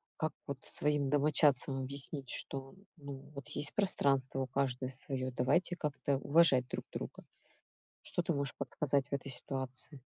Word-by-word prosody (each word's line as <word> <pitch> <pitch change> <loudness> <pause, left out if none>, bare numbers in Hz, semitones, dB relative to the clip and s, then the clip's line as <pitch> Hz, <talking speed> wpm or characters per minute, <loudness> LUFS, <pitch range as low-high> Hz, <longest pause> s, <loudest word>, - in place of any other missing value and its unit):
как 155 - -1
вот 140 -2 -4
своим 145 -2 +1
домочадцам 145 -2 +3
объяснить, 140 0 +1
что, 135 +2 -4 0.2
ну, 140 -2 -7 0.2
вот 140 +1 -8
есть 150 -1 0
пространство 135 -9 +2
у 130 - -1
каждого 130 -1 -1
своё, 130 -2 -3
давайте 130 +9 +2
как-то 145 -3 -1
уважать 140 -3 +4
друг - - -4
друга. - - -6 0.8
Что 175 - -2
ты 170 -1 0
можешь 140 -2 -2
подсказать 140 -2 0
в - - -7
этой 140 0 -2
ситуации? 130 +2 -6
140 Hz, 150 wpm, -34 LUFS, 130-150 Hz, 0.8 s, уважать